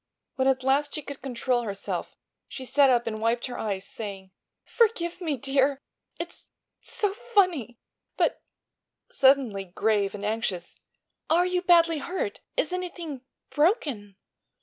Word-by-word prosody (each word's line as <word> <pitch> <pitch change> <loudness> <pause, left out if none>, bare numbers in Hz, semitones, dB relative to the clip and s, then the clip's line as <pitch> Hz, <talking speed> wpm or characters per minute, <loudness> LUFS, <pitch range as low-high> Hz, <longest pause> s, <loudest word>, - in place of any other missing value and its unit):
When 265 0 +1
at 260 -1 +2
last 275 +2 +2
she 305 - -3
could 280 0 -8
control 250 -1 0
herself 200 -4 -4 0.3
she 260 - -7
sat 275 +1 +5
up 240 -2 +3
and 215 -1 -4
wiped 230 +2 +1
her 250 - -6
eyes, 200 -3 -2
saying: 195 -4 -7 0.3
"Forgive 385 -7 +1
me, 310 -5 -1
dear, 270 +1 +1 0.4
it's—it's 340 0 -8 0.4
so 410 -2 0
funny! 370 - +1 0.4
But," - - +1 0.7
suddenly 265 -8 +3
grave 200 +2 0
and 205 0 -5
anxious, 210 -5 -3 0.5
"are 345 +3 +4
you 360 0 0
badly 335 -3 +5
hurt? 380 - -3 0.2
Is - - +1
anything—broken?" 300 - -2
270 Hz, 130 wpm, -27 LUFS, 225-340 Hz, 0.7 s, sat